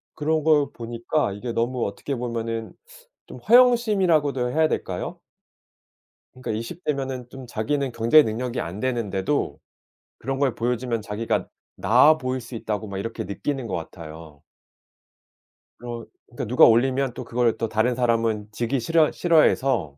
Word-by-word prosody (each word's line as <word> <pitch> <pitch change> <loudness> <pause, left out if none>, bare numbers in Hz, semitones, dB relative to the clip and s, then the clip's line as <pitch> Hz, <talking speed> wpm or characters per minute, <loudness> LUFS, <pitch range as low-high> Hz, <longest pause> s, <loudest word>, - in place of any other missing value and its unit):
그런 155 0 0
걸 150 -3 +4
보니까 120 +1 -2
이게 115 +4 -5
너무 120 +1 -1
어떻게 135 +7 -5
보면은 115 -2 -4 0.5
좀 - - -10
허영심이라고도 195 - +3
해야 155 +3 +3
될까요? - - -4 1.2
그러니까 130 0 -5
20 115 +12 -5
대면은 135 -4 -3
좀 135 0 -10
자기는 135 +4 -1
경제 115 +7 +5
능력이 120 +2 -3
안 90 +5 -6
되는데도 115 - -1 0.6
그런 135 +2 -4
걸 135 -4 +1
보여주면 120 -1 -1
자기가 105 +2 -2 0.3
'나아 155 +1 +5
보일 130 -2 -3
수 120 +1 -9
있다.'고 110 -1 -3
막 100 - -6
이렇게 115 +4 -4
느끼는 120 +7 -3
것 95 - -3
같아요. 80 -2 -9 1.4
그러 120 -1 -7 0.2
그러니까 120 - -6
누가 120 +3 +6
올리면 130 +2 +3
또 125 - -6
그걸 120 -1 0
또 115 - -1
다른 115 +4 +1
사람은 115 -3 0
지기 120 +5 -1
싫어 155 +5 +3
싫어해서 135 - +2
120 Hz, 320 characters per minute, -24 LUFS, 115-140 Hz, 1.4 s, 누가